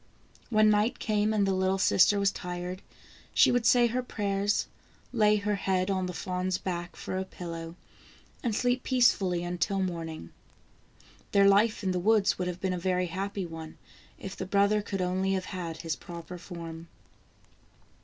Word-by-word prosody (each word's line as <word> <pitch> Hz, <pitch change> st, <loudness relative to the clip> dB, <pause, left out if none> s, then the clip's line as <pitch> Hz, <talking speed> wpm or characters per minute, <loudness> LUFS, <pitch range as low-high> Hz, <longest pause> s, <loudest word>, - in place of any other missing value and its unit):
When 215 Hz, -1 st, +5 dB
night 215 Hz, +4 st, +2 dB
came, 215 Hz, -1 st, +1 dB
and 210 Hz, -2 st, +2 dB
the 195 Hz, -, +1 dB
little 190 Hz, +1 st, +1 dB
sister 195 Hz, +1 st, +4 dB
was 200 Hz, 0 st, +3 dB
tired, 180 Hz, 0 st, -5 dB, 0.5 s
she -, -, +6 dB
would 245 Hz, -2 st, +2 dB
say 240 Hz, 0 st, +6 dB
her 240 Hz, +2 st, 0 dB
prayers, 205 Hz, -4 st, -1 dB, 0.5 s
lay 210 Hz, -3 st, +4 dB
her 210 Hz, 0 st, 0 dB
head 190 Hz, -1 st, 0 dB
on 185 Hz, -1 st, 0 dB
the -, -, -3 dB
fawn's 185 Hz, +1 st, -2 dB
back 175 Hz, -2 st, -4 dB
for 185 Hz, -, -4 dB
a -, -, -1 dB
pillow, 165 Hz, -3 st, -7 dB, 0.7 s
and 230 Hz, -4 st, -1 dB
sleep 245 Hz, +2 st, +1 dB
peacefully 200 Hz, -10 st, +2 dB
until 180 Hz, +3 st, -1 dB
morning. 165 Hz, -, -4 dB, 1.0 s
Their 200 Hz, 0 st, +6 dB
life 210 Hz, +2 st, +3 dB
in 190 Hz, -, +1 dB
the 180 Hz, -, 0 dB
woods 210 Hz, +1 st, +3 dB
would 180 Hz, -, -1 dB
have 180 Hz, 0 st, -4 dB
been 190 Hz, -1 st, -1 dB
a 180 Hz, -, -3 dB
very 180 Hz, 0 st, 0 dB
happy 195 Hz, 0 st, -3 dB
one, 160 Hz, -1 st, -9 dB, 0.4 s
if 190 Hz, -1 st, -7 dB
the 185 Hz, -, -5 dB
brother 200 Hz, +2 st, +3 dB
could 195 Hz, -2 st, -3 dB
only 190 Hz, +2 st, 0 dB
have 190 Hz, -1 st, -1 dB
had 170 Hz, -4 st, -5 dB
his 165 Hz, -2 st, -2 dB
proper 170 Hz, +2 st, -9 dB
form. 170 Hz, -2 st, -8 dB
190 Hz, 170 wpm, -29 LUFS, 180-205 Hz, 1.0 s, she